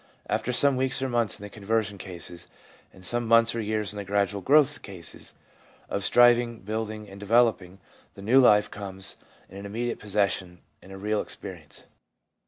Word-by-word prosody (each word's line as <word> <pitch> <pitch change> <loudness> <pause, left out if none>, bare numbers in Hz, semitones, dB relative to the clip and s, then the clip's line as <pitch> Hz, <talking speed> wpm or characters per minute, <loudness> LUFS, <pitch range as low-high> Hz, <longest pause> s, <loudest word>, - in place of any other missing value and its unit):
After 125 - -1
some 135 +2 +4
weeks 130 +1 0
or - - 0
months 120 -4 0
in - - -13
the 105 - -7
conversion 105 -1 -2
cases, 85 -2 -9 0.4
and 95 - -10
some 120 +2 +1
months 115 0 +5
or 115 - -2
years 105 -1 -2
in - - -9
the 100 - -4
gradual 100 0 -1
growth 145 +4 +4
cases, 90 -5 -10 0.5
of 100 - -2
striving, 120 0 +4
building 110 +1 -4
and 100 0 -12
developing, 105 -3 +1 0.4
the 100 - -11
new 125 +6 +5
life 105 -5 +5
becomes 95 -3 -4 0.3
an 100 +1 -10
im 100 - -7
mediate 120 +2 -3
possession 95 -4 -1 0.2
and 95 - -15
a 95 - -8
real 105 +2 -1
experience. 90 -6 -9
105 Hz, 175 wpm, -26 LUFS, 95-115 Hz, 0.5 s, months